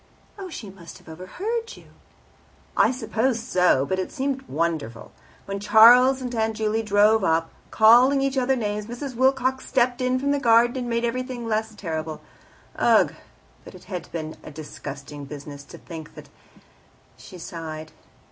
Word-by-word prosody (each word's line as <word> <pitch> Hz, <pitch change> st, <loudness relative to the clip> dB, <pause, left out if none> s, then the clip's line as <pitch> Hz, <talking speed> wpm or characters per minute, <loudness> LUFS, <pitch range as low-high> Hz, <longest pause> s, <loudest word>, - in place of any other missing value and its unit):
"Oh, 380 Hz, -2 st, -7 dB
she 215 Hz, -, -8 dB
must 175 Hz, -3 st, -13 dB
have -, -, -22 dB
overheard 390 Hz, -, -5 dB
you." -, -, -17 dB, 0.9 s
"I -, -, +4 dB
suppose 235 Hz, 0 st, -1 dB
so, 180 Hz, -, +2 dB
but 190 Hz, +5 st, -2 dB
it 185 Hz, -, -4 dB
seemed 270 Hz, -1 st, -2 dB
wonderful. 155 Hz, -, -3 dB, 0.3 s
When 195 Hz, 0 st, -4 dB
Charles 245 Hz, +5 st, +6 dB
and 250 Hz, -1 st, -5 dB
Aunt 220 Hz, -1 st, -1 dB
Juley 220 Hz, 0 st, 0 dB
drove 210 Hz, 0 st, +3 dB
up, 165 Hz, -2 st, +1 dB, 0.2 s
calling 245 Hz, +5 st, +6 dB
each 270 Hz, 0 st, -1 dB
other 265 Hz, 0 st, +1 dB
names, 210 Hz, -3 st, -3 dB
Mrs. 255 Hz, +3 st, -6 dB
Wilcox 260 Hz, +1 st, +1 dB
stepped 250 Hz, -1 st, +1 dB
in 255 Hz, 0 st, +1 dB
from 280 Hz, +2 st, -1 dB
the 285 Hz, -, +1 dB
garden 235 Hz, 0 st, +4 dB
and 245 Hz, -2 st, -4 dB
made 235 Hz, 0 st, 0 dB
everything 250 Hz, 0 st, -4 dB
less 220 Hz, 0 st, -2 dB
terrible. 160 Hz, -5 st, -5 dB, 0.6 s
Ugh! -, -, +3 dB, 0.5 s
but -, -, -13 dB
it 180 Hz, -, -14 dB
has 180 Hz, -2 st, -6 dB
been 160 Hz, -2 st, -6 dB
a -, -, -9 dB
disgusting 145 Hz, -1 st, -9 dB
business. 145 Hz, 0 st, -9 dB
To -, -, -12 dB
think 160 Hz, -2 st, -10 dB
that -, -, -12 dB, 0.5 s
" -, -, -33 dB
She 135 Hz, +8 st, -12 dB
sighed. 160 Hz, -2 st, -8 dB
220 Hz, 165 wpm, -24 LUFS, 165-255 Hz, 0.9 s, Charles